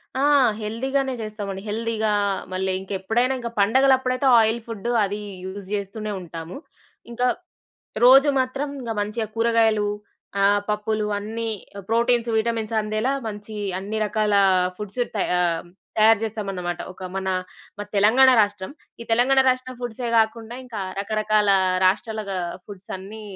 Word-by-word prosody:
ఆ! 265 - 0 0.4
హెల్దీగానే 265 +5 -1
జేస్తామండి. 205 -3 -5
హెల్దీగా, 220 0 -1 0.4
మళ్ళీ 190 0 -1
ఇంకెప్పుడైనా, 205 +7 -1
ఇంక 235 -1 -4
పండగలప్పుడైతే 260 +4 +3
ఆయిల్ 225 +1 +2
ఫుడ్డు 230 +1 -4
అదీ 205 +1 -3 0.2
యూజ్ 190 0 -7
జేస్తూనే 210 +1 -4
ఉంటాము. 165 +3 -8 0.5
ఇంక, 240 +1 -7 0.8
రోజూ 270 +3 +8
మాత్రం 270 +3 -3
ఇంగ 235 -3 -5
మంచిగా 215 +1 -3
కూరగాయలు, 225 -2 +2 0.6
ఆహ్, 205 0 +4
పప్పులు 210 0 -1
అన్నీ 225 +2 -4 0.4
ప్రోటీన్స్, 235 +1 +2
విటమిన్స్ 225 0 -1
అందేలా 215 +5 -1 0.2
మంచీ 210 0 -7 0.2
అన్ని 210 +3 -4
రకాలా 210 -1 +2 0.4
ఫుడ్స్ 210 +4 -4
త - - -1 0.2
ఆహ్, 170 -2 +1 0.3
తయారు 220 0 +6
జేస్తామనమాట. 195 -5 -3
ఒక 185 - -11
మనా 190 -1 -1 0.5
మాది 205 0 -7
తెలంగాణ 245 +6 +6
రాష్ట్రం. 205 +1 0 0.3
ఈ - - -5
తెలంగాణ 255 +4 +4
రాష్ట్రం 255 0 -2
ఫుడ్సే 240 0 -4
గాకుండా, 225 +1 +1
ఇంకా 225 -4 -6 0.2
రకరకాల 215 0 +1 0.4
రాష్ట్రాలగా 205 +1 0 0.3
ఫుడ్సన్ని 200 +2 -9
215 Hz, 125 wpm, -23 LUFS, 205-235 Hz, 0.8 s, రోజూ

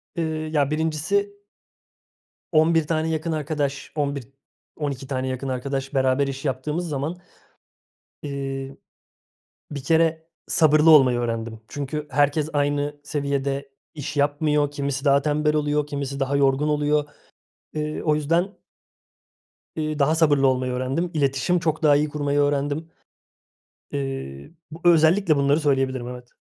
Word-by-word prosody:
Iıı, 155 -2 -2
ya, 145 -2 +1
birincisi 180 +7 -1 1.1
11 160 -1 +3
tane 160 0 0
yakın 160 +1 -2
arkadaş, 145 -2 -2
11-12 140 0 -5
tane 130 -1 -2
yakın 130 +1 -3
arkadaş 135 +1 -3
beraber 135 +1 +2
iş 135 +1 -5
yaptığımız 150 +6 -2
zaman, 150 +4 -3 1.1
eee, 135 -1 -5 0.9
bir 140 -2 -5
kere 160 +1 +2 0.2
sabırlı 155 0 +4
olmayı 130 -5 +6
öğrendim. 115 -1 -3
Çünkü 145 +1 -4
herkes 145 +2 +2
aynı 145 0 0
seviyede 140 -1 -2 0.2
iş 150 -1 -6
yapmıyor. 145 0 +1
Kimisi 140 -1 -3
daha 140 0 +5
tembel 150 +1 +1
oluyor, 150 0 0
kimisi 140 -1 -4
daha 135 +1 0
yorgun 140 +1 +2
oluyor. 150 0 +1 0.7
Eee, 150 0 -3
o 155 -2 +2
yüzden 165 +6 0 1.2
iii, 155 -1 -2
daha 150 +3 +3
sabırlı 145 -4 +4
olmayı 130 -1 +1
öğrendim. 135 +8 -2
İletişim 145 +4 +1
çok 160 -1 -1
daha 145 -2 +6
iyi 150 +1 +1
kurmayı 145 -1 -1
öğrendim. 145 +2 0 1.0
Eee, 135 - -5 0.2
b 160 - -8
özellikle 165 +1 +4
bunları 140 +2 +3
söyleyebilirim, 135 -4 0
evet. 125 0 -9
145 Hz, 125 wpm, -23 LUFS, 135-155 Hz, 1.2 s, olmayı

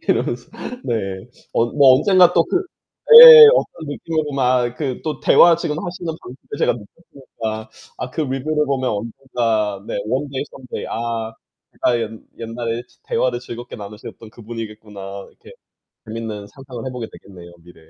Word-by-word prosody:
이러면서 - - -1 0.3
네. 100 -2 -4 0.2
어 115 - +1
뭐 135 0 +5
언젠가 180 +1 +4
또 170 - +4
그 370 +1 0 0.6
예예예. 470 -2 +12
어떤 160 - -3
느낌으로 155 0 -3
막 125 -2 0
그 135 -5 -4
또 155 -1 -4
대화 170 0 +6
지금 165 -3 -3
하시는 175 -1 -6
방법을 130 -5 -10 0.2
제가 - - +2
느꼈으니까. 110 -3 -9 0.3
아 125 - -5
그 160 - -3
리뷰를 150 +2 -2
보면 130 -2 -1
언젠가 110 -2 -3
네. - - -5
one 135 +5 -2
day, 135 +1 -4
someday. 130 -2 -8
아. 115 -1 -4 0.5
아, 120 - +3
옛 110 -1 -3 0.3
옛날에 115 0 -4
지 - - -30
'대화를 125 -1 -1
즐겁게 120 0 -9
나누셨던 105 +1 -11
그 - - -16
분이겠구나.' 105 -3 -9
이렇게 - - -18 0.5
재밌는 110 -2 -6
상상을 130 -3 -10
해보게 125 -3 -6
되겠네요, 90 -3 -14
미래에. 80 -2 -18
120 Hz, 360 characters per minute, -19 LUFS, 110-145 Hz, 0.6 s, 예예예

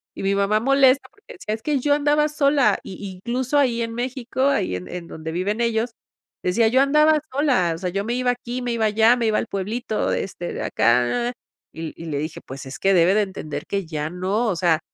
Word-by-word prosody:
y - - -6
mi 195 0 +1
mamá 200 +2 +2
molesta 270 +2 +4
porque 415 +5 -15
decía: 215 - -5
"Es 220 - -12
que 290 +2 0
yo 285 +3 +2
andaba 295 +1 +2
sola", 280 -7 +3
y 195 +1 -7
incluso 245 +8 -2
ahí 240 -4 +2
en 230 0 -3
México, 255 +2 -2
ahí 275 - +1
en 90 0 -6
en 175 -1 -6
donde 160 0 -7
viven 200 +7 -1
ellos 230 0 0 0.5
decía: 220 +5 +3
"Yo 255 +4 +4
andaba 300 +2 +4
sola. 260 - +2
O - - -7
sea, 180 - -2
yo 195 +3 -2
me 235 - -1
iba 250 0 +1
aquí, 245 0 -5
me 245 -1 -2
iba 230 -1 -1
allá, 220 +3 +4
me 235 -2 0
iba 215 - +2
al - - -1
pueblito 215 +3 -2
de - - 0
este 175 -2 -6
de - - -5
acá." 125 - +2 0.4
Y 160 0 -6
y - - -7
le 155 -3 -3
dije: 155 +2 -5
"Pues 135 +1 -8
es 130 - -8
que 195 0 +3
debe 175 +1 +5
de 215 - +4
entender 185 -6 -6
que 195 -2 -2
ya 155 -2 -3
no". 190 +7 -1
O 200 - 0
sea, 170 -2 +2
220 Hz, 235 wpm, -22 LUFS, 180-255 Hz, 0.5 s, debe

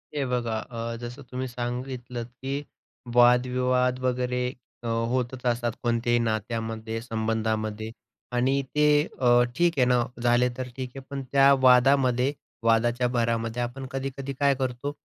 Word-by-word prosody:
हे 140 -2 0
बघा 120 -3 -1
अ, 115 0 -5
जसं 120 +3 -7
तुम्ही 130 +1 -3
सांगितलंत, 125 0 -5
की 135 +3 -5 0.5
वादविवाद 125 +1 +3
वगैरे 125 0 0 0.4
अ, - - -4
होतच 120 +2 -1
असतात 120 -1 +1
कोणत्याही 120 0 +2
नात्यामध्ये, 110 0 -2
संबंधामध्ये. 110 -1 -2 0.4
आणि 130 +3 +2
ते 150 - +3 0.4
अ, 120 -1 +5
ठीक 175 -1 +3
आहे 130 - +4
ना 125 -1 +3 0.2
झाले 120 +1 +3
तर 130 -1 -4
ठीक 130 -1 -4
आहे, - - -5
पण 140 -1 -4
त्या 140 0 +6
वादामध्ये 130 0 +4 0.3
वादाच्या 120 +2 +2
भरामध्ये 115 -1 -1
आपण 125 +3 -4
कधी-कधी 135 0 -4
काय 140 -1 +4
करतो? 130 +1 -3
125 Hz, 135 wpm, -26 LUFS, 115-130 Hz, 0.5 s, त्या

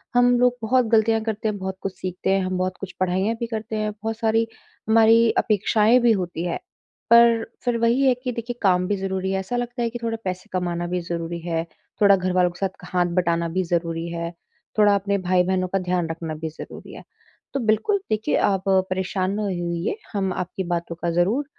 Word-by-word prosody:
हम 245 0 +5
लोग 245 0 +3
बहुत 250 +2 +2
गलतियाँ 225 0 +3
करते 220 -1 -2
हैं, 210 -1 -1
बहुत 190 0 -5
कुछ 195 -1 -4
सीखते 185 0 -3
हैं, 195 0 +3
हम 185 0 -2
बहुत 185 0 -2
कुछ 195 -2 -6
पढ़ाईयाँ 190 +5 +1
भी 235 - -2
करते 220 -1 -4
हैं, 215 0 -1
बहुत 220 +1 -5
सारी 225 0 +1 0.4
हमारी 225 +1 +6
अपेक्षाएँ 215 +3 +3
भी 235 -1 +4
होती 180 -5 -1
है। 170 - -1 0.5
पर 235 -1 +6 0.2
फिर 245 -2 +1
वही 235 +3 +2
है 260 -2 +5
कि 250 - -1
देखिए 235 +1 -5
काम 180 -2 +3
भी 205 - +1
ज़रूरी 190 0 -2
है 190 - 0
ऐसा 190 +6 -4
लगता 245 0 -3
है 235 - 0
कि 240 +1 -6
थोड़े 225 0 -1
पैसे 185 -1 -4
कमाना 175 -1 -1
भी 180 0 -2
ज़रूरी 170 0 -4
है, 165 -1 0 0.4
थोड़ा 200 -1 +7
घर 185 0 -1
वालों 180 -1 +3
के 175 - -15
साथ 195 - 0
क - - -10
हाथ 180 -1 +3
बटाना 170 -2 +1
भी 185 +2 0
ज़रूरी 165 -1 -2
है, 170 0 -4 0.5
थोड़ा 210 -1 +6
अपने 200 0 0
भाई-बहनों 185 0 +1
का 195 +1 0
ध्यान 180 -2 -1
रखना 165 -1 -4
भी 160 +1 -4
ज़रूरी 155 - -10
है। - - -10 0.5
तो 275 - 0
बिल्कुल, 220 - +2
देखिए 215 0 0
आप 195 -2 +1 0.3
परेशान 185 0 -1
ना 215 - -1
हो 200 - -1
उ - - -1 0.3
इए 205 - -2 0.2
हम 195 -2 0
आपकी 180 +2 -4
बातों 170 -1 -3
का 170 0 -3
ज़रूर 195 +12 +1
195 Hz, 215 wpm, -23 LUFS, 180-225 Hz, 0.5 s, थोड़ा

